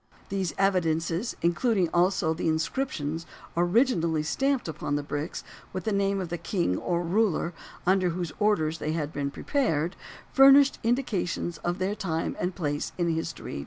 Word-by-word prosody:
These 190 -5 -2
evidences, 175 +1 +1
including 180 +2 +2
also 175 -2 +2
the 165 - -2
inscriptions 160 - -1 0.3
originally 175 - +2
stamped 270 - 0
upon 145 -2 -3
the 145 - -1
bricks, 145 +3 -4 0.3
with 185 - -3
the 220 - -1
name 200 0 +1
of 180 -3 -4
the 175 0 -3
king 175 - 0
or 175 0 -1
ruler 180 -1 +1 0.3
under 185 0 +3
whose 175 -1 -3
orders 165 -7 +2
they 155 - -2
had 155 -2 -3
been 140 -1 -2
prepared, 170 - 0 0.4
furnish 275 +1 +8
indications 210 - -1
of 175 +1 -2
their 190 +1 -1
time 170 -6 -2
and 180 0 -2
place 145 -4 -2
in 175 -1 +1
history. 165 - -4
175 Hz, 155 wpm, -27 LUFS, 160-200 Hz, 0.4 s, furnish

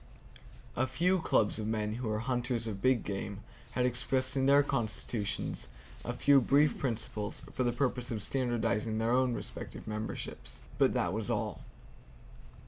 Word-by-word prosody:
A 130 +2 +1
few 175 +9 +2
clubs 110 -9 +2
of 105 - -2
men 105 -1 -1
who 120 0 -3
are 105 - 0
hunters 120 0 -1
of 100 -3 -4
big 130 -3 +3
game 100 0 -4 0.3
had 125 - +2
expressed 130 +2 0
in 135 0 +2
their 140 +1 +7
constitutions 110 -4 -2 0.4
a - - -2
few 140 -1 +5
brief 145 +4 +3
principles 110 -4 -3
for - - -2
the 120 -1 +3
purpose 125 -1 -1
of 110 -4 -2
standardizing 115 -3 0
their 115 +1 +1
own 125 -1 +3
respective - - -6
memberships, 110 0 -5 0.2
but - - +4
that 85 - +1
was 110 -1 -2
all. - - -1
120 Hz, 155 wpm, -32 LUFS, 110-130 Hz, 0.4 s, their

